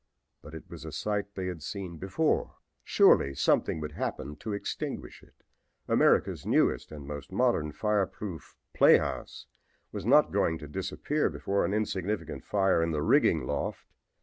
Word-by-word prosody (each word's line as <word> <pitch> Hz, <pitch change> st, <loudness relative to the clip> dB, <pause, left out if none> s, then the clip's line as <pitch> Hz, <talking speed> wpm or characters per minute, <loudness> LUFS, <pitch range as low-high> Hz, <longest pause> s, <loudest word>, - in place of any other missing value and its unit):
But 75 Hz, +2 st, -11 dB
it 80 Hz, -, -10 dB
was -, -, -10 dB
a -, -, -7 dB
sight 105 Hz, -1 st, -3 dB
they 95 Hz, -, -3 dB
had 90 Hz, -3 st, -5 dB
seen 85 Hz, +4 st, -6 dB
before. 95 Hz, -, 0 dB, 0.3 s
Surely 70 Hz, 0 st, +4 dB
something 75 Hz, -, +2 dB
would 75 Hz, 0 st, -5 dB
happen 75 Hz, -1 st, -4 dB
to 110 Hz, -, -6 dB
extinguish 100 Hz, -, -5 dB
it. -, -, -24 dB, 0.4 s
America's -, -, +3 dB
newest -, -, +1 dB
and 75 Hz, -2 st, -8 dB
most 70 Hz, +1 st, -7 dB
modern 95 Hz, -8 st, +1 dB
fireproof 100 Hz, -2 st, -2 dB, 0.2 s
playhouse -, -, +3 dB, 0.5 s
was -, -, -5 dB
not -, -, +5 dB
going 80 Hz, -, +1 dB
to 75 Hz, -1 st, -9 dB
disappear 75 Hz, -, -1 dB
before 100 Hz, 0 st, -1 dB
an 100 Hz, -, -1 dB
insignificant 105 Hz, -1 st, -2 dB
fire 95 Hz, -4 st, +2 dB
in 85 Hz, -, +1 dB
the 75 Hz, -2 st, -1 dB
rigging 65 Hz, -, +3 dB
loft. 70 Hz, +2 st, -3 dB
90 Hz, 150 wpm, -29 LUFS, 75-100 Hz, 0.5 s, not